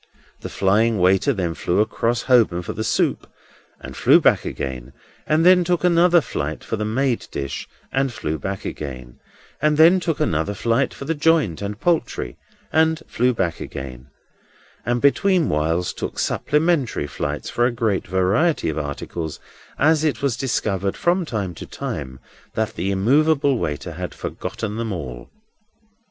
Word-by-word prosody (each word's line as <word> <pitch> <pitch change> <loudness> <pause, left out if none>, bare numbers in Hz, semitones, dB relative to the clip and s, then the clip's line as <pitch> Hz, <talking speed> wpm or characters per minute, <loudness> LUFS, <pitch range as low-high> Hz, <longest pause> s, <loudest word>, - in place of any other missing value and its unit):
The - - -7
flying 105 +4 +2
waiter 95 +8 +3
then 90 -8 -1
flew 90 +3 -1
across 115 +2 0
Holborn 110 -9 +3
for - - -5
the 110 - -3
soup, - - 0 0.5
and - - -9
flew - - +5
back - - +3
again, 65 -1 -5 0.3
and 155 +2 +3
then 180 0 +7
took 175 0 0
another 175 0 +5
flight 80 - -4
for - - -3
the 105 -1 -3
made 120 +3 0
dish, 70 -1 -5 0.2
and 135 -1 0
flew 80 -9 -3
back 95 +3 -5
again, 65 -4 -7 0.4
and 150 0 +2
then 170 +4 +7
took 165 -3 -2
another 100 - 0
flight 115 +6 +1
for 140 - -8
the 165 - 0
joint 150 - +2
and 100 +1 -4
poultry, 165 - -1 0.4
and 160 0 +2
flew 125 +2 +1
back 90 -8 -1
again, 65 -1 -7 0.8
and 120 0 +1
between 175 +4 +3
whiles 80 +4 0
took - - -5
supplementary 150 - +1
flights 75 +1 -4
for 120 0 +2
a - - -1
great 110 -4 -1
variety 95 - +1
of 80 - -2
articles, 75 +2 -5 0.4
as 155 +1 +3
it 150 -2 0
was 135 -5 +1
discovered 100 -7 -1
from 175 +1 +1
time 100 -8 -3
to - - -9
time 65 0 -6 0.4
that 110 -1 -1
the 90 +4 -2
immovable 140 +6 +3
waiter 75 -2 -3
had - - -6
forgotten 110 -1 -5
them 115 -1 -3
all. 65 -9 -6
110 Hz, 160 wpm, -22 LUFS, -, 0.8 s, then